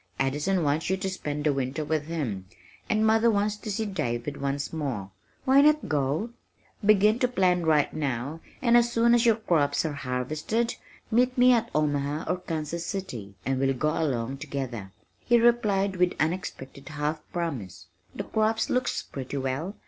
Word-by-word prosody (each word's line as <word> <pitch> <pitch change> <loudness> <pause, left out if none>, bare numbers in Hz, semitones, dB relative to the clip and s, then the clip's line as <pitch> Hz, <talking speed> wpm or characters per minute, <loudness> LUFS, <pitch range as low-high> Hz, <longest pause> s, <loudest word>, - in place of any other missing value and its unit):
Addison 150 +7 +1
wants 150 +3 0
you 190 - +1
to 190 0 -2
spend 150 -5 -4
the 150 -1 +2
winter 135 +3 -2
with 155 -1 -1
him, 120 - -3 0.4
and 220 0 +2
mother 225 +1 +4
wants 210 -1 +1
to 215 - -7
see 220 +2 -1
David 140 - -3
once 140 +1 -2
more 125 -12 -3 0.3
why 270 +2 +6
not 300 +1 +4
go? 150 - 0 0.5
Begin 215 +2 +5
to 250 - +3
plan 180 -7 +1
right 150 -2 +3
now 140 0 -3 0.2
and 235 -1 +5
as 240 0 +4
soon 235 0 +4
as 240 0 +4
your 225 - +6
crops 160 -9 +1
are 155 - -1
harvested, 145 - -2 0.4
meet 250 +3 +2
me 250 0 +7
at 235 -1 +1
Omaha 145 0 0
or 180 +2 0
Kansas 165 -1 -4
City 125 - -5
and 135 0 0
we'll 135 0 +2
all - - -8
go 150 +4 +1
along 135 -5 -1
together." 130 -9 -5 0.3
He 240 -1 +3
replied 205 -5 +2
with 180 0 +3
unexpected 155 -5 -3
half 150 +1 -2
promise. 135 - -4 0.3
"The - - -3
crops 220 0 0
look 250 0 +1 0.2
pretty 135 +1 -5
well. 135 +9 -3
160 Hz, 170 wpm, -27 LUFS, 140-215 Hz, 0.5 s, me